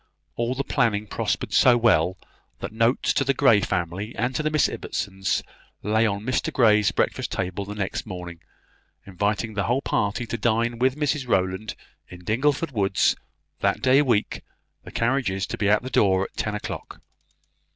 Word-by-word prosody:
All 120 +2 -1
the 140 - -1
planning 115 -7 0
prospered - - -2
so 125 -1 +6
well, 95 -6 +3 0.4
that - - -6
notes 115 +3 +2
to - - +1
the 135 0 +1
Grey 115 -7 +5
family 90 +6 -3
and 120 +3 -1
to 140 - -1
the 155 - 0
Miss 155 -1 +3
Ibbotsons 95 -2 -3 0.4
lay 110 +2 +2
on 100 -1 -2
Mr 130 0 0
Grey's 105 -5 +4
breakfast - - -1
table 95 +1 -3
the 105 +1 -7
next 100 +2 -3
morning, 90 -3 -7 0.7
inviting 105 +3 -2
the 100 -1 -1
whole 130 +4 0
party 105 +3 -1
to 115 0 -4
dine 115 +1 0
with 130 +2 +2
Mrs 145 -3 -1
Rowland 95 0 0 0.3
in 90 0 -12
Dingleford 140 - 0
woods, 100 -5 +2 0.4
that - - 0
day 130 +2 +5
week 120 -7 0 0.4
the - - -10
carriages 115 -6 0
to - - -5
be 105 - 0
at 105 +2 +3
the 130 - -6
door 95 -4 +3
at - - -8
ten 105 -1 -2
o'clock. 105 - -7
110 Hz, 170 wpm, -24 LUFS, 100-125 Hz, 0.7 s, so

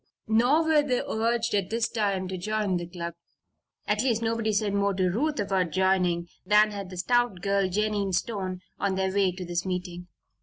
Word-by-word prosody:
Nor 245 +8 +3
were 315 -2 +4
they 255 -4 0
urged 230 +1 0
at 200 -3 0
this 230 0 0
time 200 -4 -1
to 190 - -3
join 205 0 -1
the 175 0 -5
club. 170 -1 -6 0.7
At 210 0 +1
least, 230 -3 +1
nobody 225 -1 0
said 205 -1 0
more 200 -1 +1
to 185 -1 +1
Ruth 290 - -1
about 190 -3 0
joining 180 -1 +1 0.2
than 210 +2 +4
had 200 -2 -6
the 185 - -9
stout 240 0 +1
girl, 200 -1 +1
Jennie 205 0 0
Stone, 185 -2 -2 0.2
on 195 -1 0
their 190 0 0
way 195 -2 +3
to 180 0 -7
this 175 0 -2
meeting. 180 -1 -4
200 Hz, 190 wpm, -27 LUFS, 185-220 Hz, 0.7 s, were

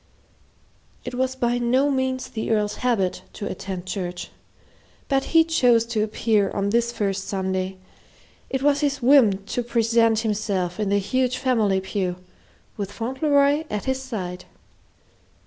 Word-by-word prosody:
It - - -5
was 260 +1 -1
by 245 -1 0
no 255 +4 +2
means 260 -1 -1
the 220 - -4
Earl's 210 -2 0
habit 220 -7 0
to 205 - -6
attend 185 -1 -5
church, 180 -2 -5 0.8
but 270 -1 +1
he 325 -1 +5
chose 245 -8 +3
to 215 - +1
appear 215 -1 +1
on 200 0 -1
this 235 +1 +2
first 195 -4 -2
Sunday 190 -1 -2 0.7
it 265 0 -2
was 285 0 +3
his 285 -3 -1
whim 230 -8 +5
to 245 - -2
present 230 -1 +2
himself 200 -5 -2
in 210 -2 0
the 200 - +3
huge 255 +5 0
family 225 -7 +2
pew, 190 -2 -2 0.6
with 200 -2 -4
Fauntleroy 280 +6 +1
at 210 -1 -3
his 265 0 -1
side. 185 -8 -5
225 Hz, 145 wpm, -23 LUFS, 195-260 Hz, 0.8 s, he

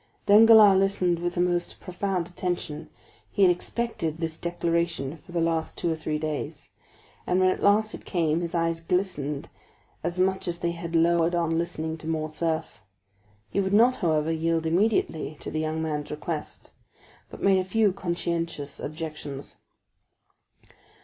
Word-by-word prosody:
Danglars 215 -2 +8
listened 185 -3 +1
with 175 0 -2
the - - -2
most 175 -1 -1
profound 185 -1 -2
attention; 175 -3 -4 0.4
he 200 - +1
had 180 - +7
expected 175 -4 -2
this 165 -1 -3
declaration 170 -4 -1
for 155 - -17
the 175 - -1
last 165 -1 -1
two 170 - 0
or - - 0
three 155 -1 -3
days, 150 -1 -5 0.6
and 180 - +2
when 185 0 +4
at - - -1
last 215 +2 +3
it - - -8
came 165 -3 0
his 170 0 -3
eyes 165 0 +1
glistened 165 -5 -2 0.5
as 175 - -2
much 190 +1 +1
as 170 -1 -2
they 170 0 -1
had 170 0 -5
lowered 170 +1 +3
on 165 -1 +1
listening 160 -1 -3
to 160 - -9
Morcerf. 160 +1 -2 0.7
He - - 0
would 190 0 0
not, 240 +4 +5
however, 160 -3 +1
yield 165 0 0
immediately 165 -4 +1
to - - -7
the 155 - -2
young 155 +1 -2
man's 150 -2 -3
request, 150 +1 -5 0.6
but - - -10
made 195 -1 +5
a - - 0
few 205 +1 +2
conscientious 170 -5 -3
objections. 150 -3 -6
170 Hz, 155 wpm, -26 LUFS, 160-185 Hz, 0.7 s, Danglars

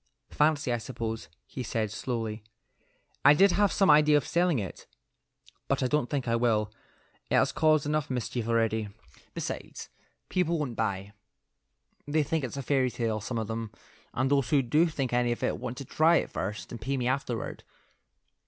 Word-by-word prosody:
"Fancy, 150 -4 +2
I 120 - -1
suppose," 115 -1 -5 0.2
he 130 - -7
said, 110 -3 -2
slowly. 115 -2 -3 0.8
"I 145 +2 +8
did 195 +4 +5
have 205 +1 +3
some 195 -5 +4
idea 150 0 +6
of 145 - -1
selling 175 -3 +2
it, 100 -5 -6 0.8
but - - 0
I - - +2
don't 150 -2 0
think 135 -4 -2
I 115 - +2
will. 110 -3 +1 0.6
It - - +2
has - - +3
caused 155 -2 +3
enough 150 0 -1
mischief 120 -2 -3
already. 115 -2 +1 0.5
Besides, - - -5 0.4
people 170 -2 +1
won't 140 -6 -3
buy. 100 -2 -2 0.9
They 150 +1 +2
think 155 +1 -1
it's 130 +1 -4
a 140 - -3
fairy 130 -1 +2
tale; 115 -3 -2
some 120 +2 -4
of 110 - -1
them, 115 0 -4 0.4
and 130 +2 0
those 140 -2 +2
who 145 -4 +3
do 150 +8 +3
think 135 -6 -3
anything 120 -1 +2
of - - -8
it - - 0
want 125 -1 -5
to 140 - -6
try 160 +6 +4
it - - 0
first 105 +3 -4
and 120 - -7
pay 135 +4 -1
me 125 -1 -1
afterward." 125 -3 -2
125 Hz, 180 wpm, -28 LUFS, 115-150 Hz, 0.9 s, I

